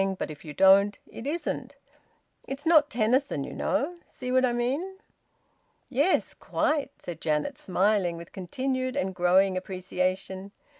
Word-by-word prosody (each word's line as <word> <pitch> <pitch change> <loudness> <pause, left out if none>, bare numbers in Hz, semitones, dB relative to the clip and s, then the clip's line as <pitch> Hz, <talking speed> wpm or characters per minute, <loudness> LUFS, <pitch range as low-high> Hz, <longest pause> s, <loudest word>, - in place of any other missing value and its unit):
But - - -3
if 150 - -11
you 155 - -7
don't, 195 +4 +5
it 230 - -8
isn't. 330 +4 -3 0.7
It's 270 +3 -5
not 310 -3 +5
Tennyson, 240 - +1
you - - -7
know. 345 +6 -1
See 250 - -6
what 255 0 +4
I 255 - +3
mean?" 275 +11 -1 0.9
"Yes, 285 +8 +2
quite!" 295 -2 0
said 170 -2 -7
Janet, 150 -1 -1
smiling 185 -2 +1
with 170 0 -10
continued 255 +7 -2
and 190 +1 -1
growing 185 +2 +3
appreciation. 185 +1 -3
205 Hz, 140 wpm, -27 LUFS, 185-270 Hz, 0.9 s, don't